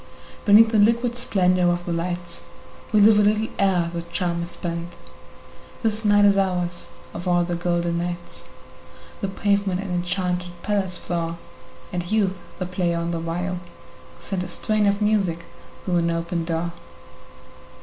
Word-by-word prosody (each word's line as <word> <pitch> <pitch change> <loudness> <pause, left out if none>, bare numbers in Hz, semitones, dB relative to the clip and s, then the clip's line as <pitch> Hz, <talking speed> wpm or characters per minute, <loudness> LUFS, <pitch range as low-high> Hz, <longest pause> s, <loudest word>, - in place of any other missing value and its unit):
Beneath 220 +2 +7
the 220 -1 +2
liquid 235 +3 +3
splendor 185 -7 +2
of 175 0 -1
the 175 - -2
lights 175 0 -4 0.5
We 215 -2 +5
live 210 0 +7
a - - +6
little 215 +1 +2
ere 180 -4 +2
the 170 - -2
charm 170 0 -2
is 170 - -4
spent; 170 0 -5 0.9
This 220 0 0
night 205 -1 +5
is 200 -1 +5
ours, 180 -3 -1 0.3
of 175 +2 -6
all 175 -1 +3
the 175 0 -3
golden 170 0 0
nights, 175 - -5 0.7
The - - -1
pavement 200 -1 0
an 195 -1 -4
enchanted 180 0 -2
palace 195 -4 -1
floor, 170 -1 -3 0.6
And 175 +1 -3
Youth 195 -4 +1 0.2
the 185 - -3
player 180 -2 -1
on 170 0 -2
the 170 - -2
viol, 175 +2 -2
who - - -9 0.6
sent 195 -2 -3
A 180 - -4
strain 210 +4 0
of 200 +1 +1
music 190 -6 +1 0.4
through 180 -2 +1
an 170 0 +2
open 170 0 -2
door. 170 +1 -2
180 Hz, 160 wpm, -23 LUFS, 170-200 Hz, 0.9 s, Beneath